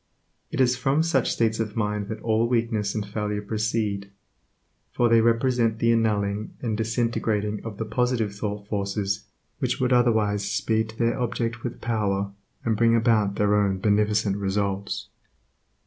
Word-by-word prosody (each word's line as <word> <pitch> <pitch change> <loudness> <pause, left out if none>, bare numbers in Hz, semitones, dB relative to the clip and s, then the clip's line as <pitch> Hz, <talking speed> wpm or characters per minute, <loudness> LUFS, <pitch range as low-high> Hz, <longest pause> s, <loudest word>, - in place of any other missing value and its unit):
It - - -4
is 125 -1 +4
from 135 +5 +1
such 165 -7 +1
states 110 -1 +1
of 110 -2 -2
mind 105 -2 -1
that 110 - -6
all 115 0 +2
weakness 115 -4 0
and 105 -2 -2
failure 105 0 -2
proceed, 105 -2 -1 0.8
for 120 - +2
they 115 0 +5
represent 115 0 +2
the 115 +1 +3
annulling 105 -2 0
and 115 -3 -2
disintegrating 110 -2 -1
of 110 -3 -7
the 115 - -3
positive 115 -1 0
thought 100 0 -4
forces 100 0 -2 0.3
which - - -1
would 130 0 +2
otherwise 110 -4 +3
speed 110 0 0
to 110 - -11
their 115 +2 +1
object 115 -1 -2
with 120 - -5
power, 100 -3 -1 0.3
and 110 -2 +1
bring 115 +1 +4
about 110 -4 +2
their 105 0 +2
own 100 -2 +2
beneficent 105 0 +2
results. 100 0 -2
110 Hz, 155 wpm, -25 LUFS, 105-115 Hz, 0.8 s, they